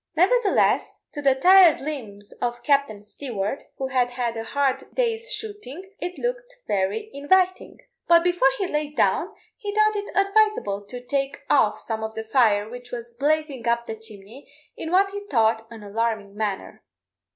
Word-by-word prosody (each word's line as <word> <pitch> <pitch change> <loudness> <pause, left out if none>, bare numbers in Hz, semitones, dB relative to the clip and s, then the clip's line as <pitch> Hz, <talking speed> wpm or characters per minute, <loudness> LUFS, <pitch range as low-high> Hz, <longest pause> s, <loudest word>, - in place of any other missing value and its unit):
Nevertheless, 400 +6 +2
to 290 - -5
the 275 -2 +4
tired 360 +3 +7
limbs 220 -9 -7
of 240 0 -2
Captain 275 -8 +1
Stewart, 215 +1 -4 0.2
who 265 -1 -3
had 250 -2 +1
had 240 -2 -2
a 225 - -4
hard 275 +2 -1
day's 465 -1 -1
shooting, 405 - -7
it 360 +1 -5
looked - - -4
very 200 - -1
inviting; 370 +6 +1 0.3
but 335 0 +6
before 355 -6 +3
he 390 - -1
lay 300 -3 -1
down, 295 - +1 0.3
he 415 -4 -5
thought 430 0 +3
it 410 0 -4
advisable 395 - +2
to 245 +3 -8
take 275 +1 -2
off - - +4
some 220 -1 -4
of 220 0 -5
the 220 - -4
fire, 220 -3 +3
which 245 +1 -10
was 235 -1 -7
blazing 285 -1 -1
up 235 0 +1
the 225 - -5
chimney 220 +3 -12 0.2
in 320 - -6
what 390 +3 +3
he 405 0 -5
thought 225 -2 +2
an 225 -2 -11
alarming 210 -1 -2
manner. 210 -2 -4
270 Hz, 165 wpm, -24 LUFS, 225-370 Hz, 0.3 s, tired